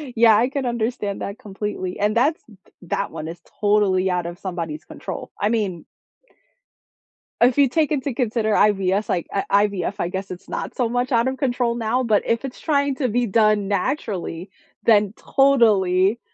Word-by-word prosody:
Yeah, 225 -2 +6
I 245 +3 +2
can 275 -1 -3
understand 230 -4 -2
that 200 +5 -5
completely, 200 -3 -5
and 210 +2 +1
that's 285 +7 +2 0.4
that 175 - -2
one 155 - -6
is 165 +1 -7 0.2
totally 205 -3 +3
out 180 -1 -1
of 175 +1 -7
somebody's 170 -5 -5
control, - - -7
I 205 - +1
mean 200 -7 -2 1.6
if 245 +2 +4
you 280 -2 +6
take 310 +4 +1
into 280 -2 -1
consider 225 -3 0
IVS, 200 -1 +2
like 175 - -1
I 200 +1 +2
IVF, 190 -4 -3
I - - 0
guess 190 +2 -5
it's 180 - -9
not - - -5
so 245 -3 +1
much 245 +2 -1
out 235 +1 +3
of 260 0 -2
control 245 -3 0
now, 235 +2 0
but 215 -4 +2
if 230 +3 0
it's 255 - -7
trying 280 -3 +1
to 255 -4 -1
be 245 +3 +1
done 215 -1 +2
naturally, 195 - -2 0.4
then 210 -2 +4
totally 215 -7 +3
215 Hz, 175 wpm, -22 LUFS, 190-245 Hz, 1.6 s, Yeah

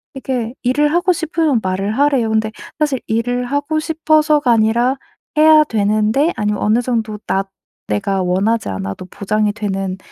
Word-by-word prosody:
이게 250 -3 -3
일을 295 +4 +2
하고 350 +2 +2
싶으면 320 -6 0
말을 195 +4 -2
하래요. 275 -5 +2
근데 220 0 0 0.3
사실 290 -5 0
일을 245 +2 -1
하고 285 +4 -1
싶어서가 310 -3 +2
아니라 235 +3 +2 0.4
해야 310 0 +7
되는데 215 +5 +1
아니면 210 -1 -1
어느 220 +3 +2
정도 225 -3 -2
나 195 - 0 0.4
내가 200 -2 -1
원하지 195 - 0
않아도 95 - -5
보장이 210 +3 -1
되는 195 -3 -3
230 Hz, 325 characters per minute, -17 LUFS, 210-290 Hz, 0.4 s, 해야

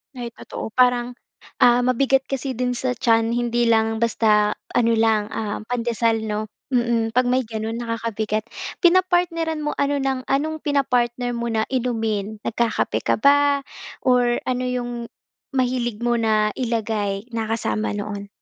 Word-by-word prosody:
Ay 240 -1 -5
totoo. - - -7
Parang, 245 -1 +3 0.5
ah, 245 0 +6
mabigat 265 +2 +2
kasi 270 0 -3
din 250 0 -1
sa 255 +1 -1
tiyan, 230 -2 +2
hindi 240 0 0
lang 225 -1 +3
basta 210 -2 +3 0.2
ano 230 -1 +3
lang, 220 -2 +2
ah, 215 -1 -3
pandesal 230 -1 0
'no? 215 -1 -2 0.3
Mm, 235 -2 +1
'pag 255 -1 +3
may 255 +1 +2
ganun 225 +1 -4
nakakabigat. 225 -2 -2 0.4
Pinapartneran 340 -3 +2
mo 295 - -1
ano 280 0 +1
ng 265 -1 -1
anong 310 +3 0
pinapartner 245 -4 +1
mo 235 0 -2
na 220 -1 +1
inumin? 220 -4 -1
Nagkakape 230 0 0
ka - - +2
ba 285 +1 +4 0.4
or 245 -1 +3
ano 255 0 0
yung 245 -1 -2 0.6
mahilig 245 -3 0
mo 240 0 +2
na 215 -1 +2
ilagay 220 -3 -1
na 225 -1 -2
kasama 225 -1 -1
noon? 205 -1 -5
240 Hz, 145 wpm, -22 LUFS, 225-255 Hz, 0.6 s, ah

